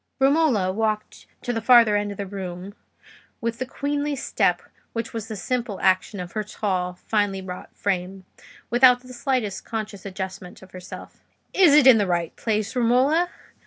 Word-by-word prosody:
Romola 270 Hz, -, +3 dB
walked 215 Hz, +1 st, -3 dB, 0.2 s
to 245 Hz, -, -2 dB
the 225 Hz, -, -2 dB
farther 230 Hz, -3 st, +6 dB
end 205 Hz, 0 st, 0 dB
of 200 Hz, -, -7 dB
the 200 Hz, -, -4 dB
room, 190 Hz, 0 st, -7 dB, 0.7 s
with 230 Hz, -2 st, -3 dB
the 255 Hz, -, -3 dB
queenly 285 Hz, +2 st, -2 dB
step 275 Hz, -, 0 dB, 0.3 s
which 230 Hz, -1 st, -4 dB
was 225 Hz, -2 st, -5 dB
the 220 Hz, -, -5 dB
simple 235 Hz, -1 st, -3 dB
action 185 Hz, +2 st, +1 dB
of 175 Hz, -1 st, -6 dB
her 215 Hz, -, -2 dB
tall, 185 Hz, -3 st, -2 dB
finely 205 Hz, 0 st, -1 dB
wrought 185 Hz, -1 st, -8 dB
frame, 190 Hz, -1 st, -2 dB, 0.5 s
without 250 Hz, 0 st, +6 dB
the 255 Hz, 0 st, -12 dB
slightest 240 Hz, -6 st, -2 dB
conscious 215 Hz, -3 st, -5 dB
adjustment 190 Hz, -2 st, -7 dB
of 190 Hz, -, -16 dB
herself. 180 Hz, -1 st, -11 dB, 0.3 s
"Is 350 Hz, -7 st, +6 dB
it 300 Hz, -3 st, +6 dB
in 255 Hz, -4 st, +8 dB
the 205 Hz, -, +1 dB
right 170 Hz, -2 st, -1 dB
place, 215 Hz, -1 st, -2 dB
Romola?" 260 Hz, +8 st, +3 dB
215 Hz, 165 wpm, -24 LUFS, 190-250 Hz, 0.7 s, in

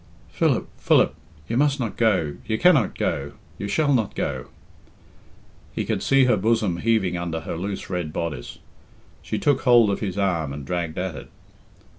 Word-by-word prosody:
"Philip, -, -, +1 dB
Philip, -, -, +3 dB, 0.3 s
you 115 Hz, -, -1 dB
must 145 Hz, 0 st, +2 dB
not 115 Hz, -6 st, -3 dB
go 95 Hz, -11 st, +1 dB
you 110 Hz, -, 0 dB
cannot 155 Hz, -4 st, +4 dB
go 70 Hz, 0 st, -2 dB, 0.3 s
you 100 Hz, -, -3 dB
shall 145 Hz, +5 st, +2 dB
not 110 Hz, -6 st, 0 dB
go!" -, -, -3 dB, 1.3 s
He -, -, -2 dB
could -, -, -1 dB
see 135 Hz, -1 st, +4 dB
her 125 Hz, -3 st, +3 dB
bosom 105 Hz, -3 st, +1 dB
heaving 95 Hz, -4 st, +1 dB
under 85 Hz, -2 st, -3 dB
her 80 Hz, -, -5 dB
loose 95 Hz, +4 st, -4 dB
red 90 Hz, -4 st, -3 dB
bodice. 75 Hz, -7 st, -4 dB, 0.6 s
She -, -, -3 dB
took 145 Hz, -3 st, +2 dB
hold 120 Hz, -4 st, +5 dB
of 100 Hz, -, -2 dB
his 100 Hz, -3 st, -4 dB
arm 85 Hz, -8 st, 0 dB
and 70 Hz, -1 st, -7 dB
dragged 85 Hz, 0 st, -3 dB
at 95 Hz, -1 st, -2 dB
it. -, -, -10 dB
100 Hz, 170 wpm, -23 LUFS, 85-115 Hz, 1.3 s, hold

